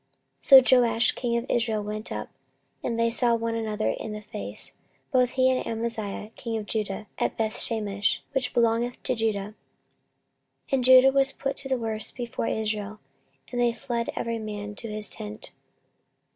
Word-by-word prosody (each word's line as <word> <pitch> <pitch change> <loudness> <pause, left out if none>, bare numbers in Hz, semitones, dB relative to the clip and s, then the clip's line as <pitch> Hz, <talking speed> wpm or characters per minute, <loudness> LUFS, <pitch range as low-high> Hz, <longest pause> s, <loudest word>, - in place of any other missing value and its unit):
14:025:021 - - -5 0.2
So 255 - +8
Joash 230 -1 +3
the - - -11
king 235 -2 +1
of 235 - -2
Israel 225 -3 0
went 215 +1 -5
up; 105 0 -4 0.5
and 230 -1 -2
they 230 0 +2
saw 235 0 +3
one 230 0 -2
another 220 -1 -1
in 215 - -5
the 210 - -6
face, 210 0 -4 0.4
both 250 -3 +3
he 260 0 +3
and 255 - 0
Amaziah 220 -2 -3
king 230 -1 -4
of 215 - -5
Judah, 210 -1 -3
at - - -1
Bethshemesh, 215 -2 -1
which 265 -2 0
belongeth 235 +1 +1
to - - +1
Judah. 215 -4 -1 1.2
14:025:022 - - -19
And 265 -2 +2
Judah 260 +1 +8
was 270 0 +4
put 275 0 -3
to 275 -1 -6
the 260 - +2
worse 220 -2 -1
before 240 -2 -4
Israel, 215 -1 -2 0.5
and 245 -1 -1
they 240 -1 +4
fled 235 0 -3
every 230 -1 -2
man 210 -1 -5
to 225 +2 -7
his 210 0 -1
tent. 105 0 -7
230 Hz, 175 wpm, -26 LUFS, 215-245 Hz, 1.2 s, So